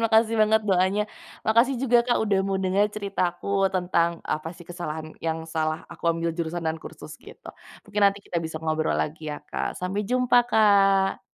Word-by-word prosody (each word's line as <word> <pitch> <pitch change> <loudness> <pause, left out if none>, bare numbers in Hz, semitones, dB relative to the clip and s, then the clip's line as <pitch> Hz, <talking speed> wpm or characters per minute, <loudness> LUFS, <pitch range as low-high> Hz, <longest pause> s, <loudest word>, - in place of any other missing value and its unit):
makasih 225 0 +4
banget 220 0 +4
doanya, 190 +2 +2 0.4
makasih 230 +5 +4
juga, 245 -2 +4
Kak, 240 - +2
udah 200 -2 +2
mau 195 -1 0
denger 190 +2 +2
ceritaku 195 -1 0
tentang 175 -2 +2
apa 155 +1 -3
sih 175 - -13
kesalahan 160 -3 -6
yang 160 0 -2
salah 160 0 -2
aku 170 - -14
ambil 165 0 -1
jurusan 170 0 -3
dan 160 0 -2
kursus - - -10
gitu, - - -14 0.4
mungkin 210 0 -3
nanti 200 0 +1
kita 170 - -2
bisa 160 -1 -5
ngobrol 155 0 0
lagi 155 0 -3
ya, 150 - -4
Kak, - - -3
sampai 185 +3 -2
jumpa, 250 -1 +2
Kak. 195 -3 +4
185 Hz, 175 wpm, -25 LUFS, 165-205 Hz, 0.4 s, makasih